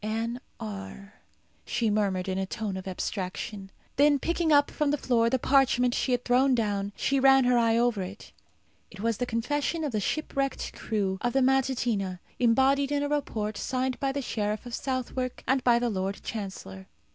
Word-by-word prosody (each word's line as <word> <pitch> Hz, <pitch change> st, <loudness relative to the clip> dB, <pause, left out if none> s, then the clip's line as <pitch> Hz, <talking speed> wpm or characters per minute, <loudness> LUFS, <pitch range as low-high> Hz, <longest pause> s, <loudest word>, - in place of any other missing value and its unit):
"Anne 225 Hz, +3 st, -2 dB, 0.2 s
R," 200 Hz, -2 st, -7 dB, 0.5 s
she 230 Hz, -3 st, 0 dB
murmured 195 Hz, -3 st, 0 dB
in 190 Hz, 0 st, -1 dB
a 190 Hz, -, -1 dB
tone 210 Hz, -2 st, -4 dB
of 190 Hz, 0 st, -6 dB
abstraction. 195 Hz, +1 st, -4 dB, 0.3 s
Then 290 Hz, +1 st, +5 dB
picking 335 Hz, +2 st, 0 dB
up 290 Hz, -1 st, +5 dB
from 300 Hz, -1 st, 0 dB
the 290 Hz, -, +1 dB
floor 235 Hz, -4 st, +2 dB
the 260 Hz, -, +2 dB
parchment 250 Hz, -2 st, +3 dB
she 260 Hz, -, 0 dB
had 245 Hz, 0 st, 0 dB
thrown 255 Hz, +2 st, +4 dB
down, 205 Hz, -3 st, -1 dB
she 275 Hz, 0 st, +1 dB
ran 270 Hz, 0 st, +6 dB
her 250 Hz, 0 st, +3 dB
eye 230 Hz, -1 st, +3 dB
over 235 Hz, -4 st, +2 dB
it. 190 Hz, +3 st, -8 dB, 0.6 s
It 195 Hz, -, -11 dB
was 230 Hz, -1 st, 0 dB
the 245 Hz, -, -2 dB
confession 290 Hz, +8 st, -1 dB
of 295 Hz, -, -1 dB
the 215 Hz, -, 0 dB
shipwrecked 275 Hz, +3 st, -2 dB
crew 195 Hz, -4 st, -2 dB
of 245 Hz, -, 0 dB
the 270 Hz, -1 st, +3 dB
Matutina, 245 Hz, -8 st, +1 dB, 0.2 s
embodied 270 Hz, +4 st, +3 dB
in 290 Hz, 0 st, +1 dB
a 290 Hz, -, -1 dB
report 215 Hz, -8 st, -2 dB
signed 255 Hz, 0 st, -2 dB
by 275 Hz, -1 st, 0 dB
the 280 Hz, 0 st, -3 dB
sheriff 210 Hz, -1 st, -2 dB
of 245 Hz, -, -8 dB
Southwark 255 Hz, -1 st, -3 dB
and 265 Hz, 0 st, +2 dB
by 240 Hz, -1 st, +5 dB
the 240 Hz, -1 st, 0 dB
lord 195 Hz, 0 st, -3 dB
chancellor. 190 Hz, -, -6 dB
240 Hz, 185 wpm, -28 LUFS, 205-270 Hz, 0.6 s, ran